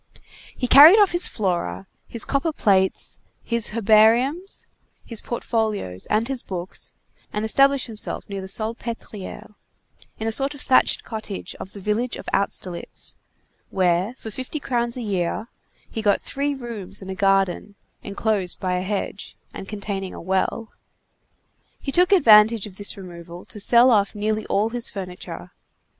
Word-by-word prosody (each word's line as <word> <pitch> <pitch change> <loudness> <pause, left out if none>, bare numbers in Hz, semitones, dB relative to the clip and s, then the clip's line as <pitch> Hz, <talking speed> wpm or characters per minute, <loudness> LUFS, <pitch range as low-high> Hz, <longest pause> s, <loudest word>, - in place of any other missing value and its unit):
He 250 - -1
carried 300 - +10
off 410 -3 +5
his 350 0 +5
Flora, 170 - -2 0.2
his 230 - -2
copper 280 +4 0
plates, 190 -9 +1 0.2
his 235 -2 +1
herbariums, 230 - +3 0.4
his 230 -3 -3
portfolios, 220 - -2
and 220 +2 +1
his 265 -2 -3
books, 180 -1 -5 0.4
and 210 +1 -2
established 275 +4 +3
himself 220 -2 -6
near 200 -1 -5
the 190 - -7
Salpêtrière, 220 -1 -6 0.6
in 220 - -3
a - - +1
sort 275 +5 -1
of 280 - -8
thatched 260 - +3
cottage 215 -4 -6
of 190 - -8
the 205 - -9
village 215 +5 -1
of - - -10
Austerlitz, 185 -3 -3 0.6
where, 185 +4 +1
for 220 - -8
fifty 260 +7 -5
crowns 240 -3 -1
a 245 - -4
year, 200 +2 -2 0.4
he 220 - -3
got 205 -2 +3
three 280 +1 -2
rooms 230 -7 -4
and 190 - -6
a - - -2
garden 195 +1 +1 0.3
enclosed 200 -2 -1
by 180 -1 -1
a - - -1
hedge, 200 +1 -4 0.2
and 195 - -8
containing 200 -2 -4
a - - -8
well. 190 +5 -1 1.1
He 275 - -4
took 360 +5 +4
advantage 220 - +6
of 195 -3 -11
this 205 0 -3
removal 175 -2 -10
to 210 - -9
sell 240 +5 +5
off 205 -2 +2
nearly 215 +1 -1
all 210 +3 +1
his 240 0 -3
furniture. 180 - -8
215 Hz, 150 wpm, -23 LUFS, 195-240 Hz, 1.1 s, carried